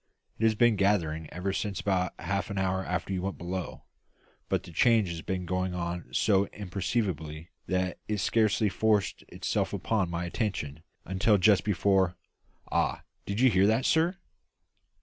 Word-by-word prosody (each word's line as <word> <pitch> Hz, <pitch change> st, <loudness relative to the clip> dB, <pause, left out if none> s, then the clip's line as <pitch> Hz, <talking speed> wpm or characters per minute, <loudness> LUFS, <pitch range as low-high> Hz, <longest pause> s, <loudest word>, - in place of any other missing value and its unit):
It 110 Hz, -, +2 dB
has 110 Hz, -1 st, +4 dB
been 120 Hz, -1 st, +4 dB
gathering 80 Hz, -6 st, +1 dB
ever 95 Hz, +2 st, -2 dB
since 100 Hz, -1 st, -2 dB
about 90 Hz, -2 st, 0 dB
half 100 Hz, +1 st, -2 dB
an 100 Hz, -, -4 dB
hour 95 Hz, 0 st, 0 dB
after 90 Hz, +1 st, -2 dB
you 90 Hz, -, -1 dB
went 95 Hz, +1 st, -3 dB
below; 90 Hz, +1 st, -5 dB, 0.7 s
but -, -, 0 dB
the -, -, -11 dB
change 110 Hz, +2 st, +3 dB
has 85 Hz, -1 st, -5 dB
been 90 Hz, 0 st, -3 dB
going 90 Hz, +1 st, -1 dB
on 85 Hz, -1 st, -3 dB
so 100 Hz, +7 st, +3 dB
imperceptibly 90 Hz, -5 st, -3 dB, 0.2 s
that 90 Hz, -1 st, -1 dB
it 105 Hz, -, -1 dB
scarcely 110 Hz, +2 st, +2 dB
forced 105 Hz, 0 st, +1 dB
itself -, -, -2 dB
upon 105 Hz, -6 st, 0 dB
my 85 Hz, 0 st, -3 dB
attention 85 Hz, -, -3 dB, 0.2 s
until 95 Hz, +3 st, +3 dB
just 100 Hz, +1 st, +4 dB
before 95 Hz, -2 st, +2 dB, 0.6 s
Ah! -, -, 0 dB, 0.2 s
did 100 Hz, +2 st, -2 dB
you 130 Hz, -1 st, +6 dB
hear 95 Hz, 0 st, +4 dB
that, 110 Hz, +4 st, +2 dB
sir?" 170 Hz, +4 st, +2 dB
95 Hz, 160 wpm, -29 LUFS, 90-105 Hz, 0.7 s, you